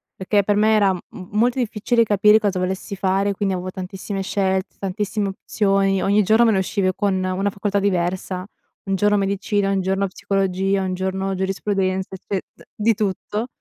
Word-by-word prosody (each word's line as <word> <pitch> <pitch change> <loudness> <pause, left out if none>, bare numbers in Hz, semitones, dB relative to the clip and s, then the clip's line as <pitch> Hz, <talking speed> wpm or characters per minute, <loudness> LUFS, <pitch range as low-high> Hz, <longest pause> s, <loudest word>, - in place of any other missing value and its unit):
perché 200 +2 +1
per 205 +1 +1
me 215 +1 +4
era 200 -2 +4
m - - -4
m 185 - -10
molto 245 +4 +2
difficile 230 0 +1
capire 210 0 +5
cosa 200 -4 0
volessi 190 +2 -3
fare, 195 +1 +1
quindi 195 -1 -1
avevo 185 +1 -4
tantissime 190 +1 -5
scelte, 190 -1 -1
tantissime 200 +1 -2
opzioni, 195 -1 +1
ogni 205 +2 +3
giorno 220 +4 +4
me 225 - +4
ne 200 - +2
uscivi 190 0 0
con 200 -2 +1
una 185 +2 0
facoltà 200 0 -1
diversa, 185 -1 -1 0.4
un 195 -1 0
giorno 205 +2 +3
medicina, 200 0 0
un 195 -1 +1
giorno 195 +1 0
psicologia, 195 0 0
un 185 -1 -2
giorno 190 +1 -2
giurisprudenza, 190 0 -1
cioè 195 +1 -3 0.2
d - - -17
di 225 +2 +2
tutto, 210 +3 -2
195 Hz, 175 wpm, -21 LUFS, 190-205 Hz, 0.4 s, capire